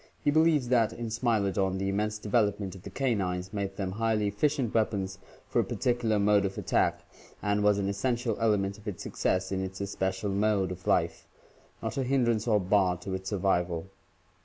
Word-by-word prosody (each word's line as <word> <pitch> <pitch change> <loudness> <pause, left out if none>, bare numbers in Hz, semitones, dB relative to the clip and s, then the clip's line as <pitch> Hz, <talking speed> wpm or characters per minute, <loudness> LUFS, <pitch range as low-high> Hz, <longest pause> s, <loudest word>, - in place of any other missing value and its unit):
He 145 - +3
be 155 - +4
lieves 155 -6 +3
that 115 -4 +3
in 115 -2 -5
Smilodon, 100 -5 +1
the 95 +1 -1
immense 105 +2 -1
development 105 -3 0
of 95 - -11
the - - -8
canines 95 -8 -1
"made 100 -1 -3
them 95 -1 -3
highly 110 +1 0
efficient 130 +3 0
weapons 100 -4 0 0.3
for - - +1
a - - +4
particular 120 -4 0
mode 100 0 +4
of 95 -1 -3
attack - - +1 0.3
and 105 0 0
was 105 -1 +4
an 100 -1 -1
essential 115 +3 0
element 105 -3 +1
of 105 - -14
its 100 - -4
success 95 +1 -1
in 95 0 -1
its 95 0 -6
especial 95 0 -2
mode 100 -2 +1
of 90 -1 -8
life, - - +1 0.6
not - - -3
a 135 - +1
hindrance 120 -3 +1
or 105 -2 +4
bar 95 -1 +2
to 95 +2 -6
its 95 0 -4
survival." 90 -2 0
105 Hz, 185 wpm, -29 LUFS, 95-115 Hz, 0.6 s, be